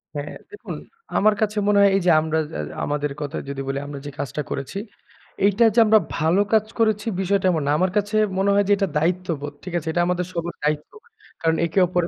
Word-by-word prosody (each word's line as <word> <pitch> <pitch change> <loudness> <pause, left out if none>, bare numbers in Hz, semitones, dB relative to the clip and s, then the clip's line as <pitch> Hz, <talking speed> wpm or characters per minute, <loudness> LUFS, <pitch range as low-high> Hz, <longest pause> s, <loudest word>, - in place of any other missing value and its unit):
হ্যাঁ, 145 0 -5 0.2
দেখুন, 415 - -7 0.4
আমার 215 +2 +4
কাছে 215 0 0
মনে 205 0 +4
হয় 200 - +7
এই 195 - +2
যে 180 - +6
আমরা 160 0 -1
যে - - -13
আ - - 0 0.2
আমাদের 145 0 -1
কথা 145 +1 -4
যদি 140 -1 -4
বলি 135 0 -1
আমরা 145 -1 -7
যে 145 - -5
কাজটা 145 +2 -3
করেছি, 140 +7 -4 0.7
এইটা 205 +3 +4
যে - - +6
আমরা 215 0 +6 0.2
ভালো 165 +5 +3
কাজ 215 -1 +4
করেছি 215 -1 +1
বিষয়টা 195 0 +1
এমন 160 -3 0
না। - - +3
আমার 185 0 +2
কাছে 205 +1 0 0.2
মনে 195 +1 +2
হয় 205 - +4
যে - - +1
এটা 195 - +1
দায়িত্ববোধ, 165 -3 -1
ঠিক 180 - -7
আছে? 165 -1 -5
এটা 175 - +1
আমাদের 180 0 0
সবার 170 0 -3
দায়িত্ব। 150 0 -1 0.5
কারণ 165 0 +2
একে 170 +4 0
ওপরে 175 -1 0
175 Hz, 220 wpm, -22 LUFS, 150-200 Hz, 0.7 s, হয়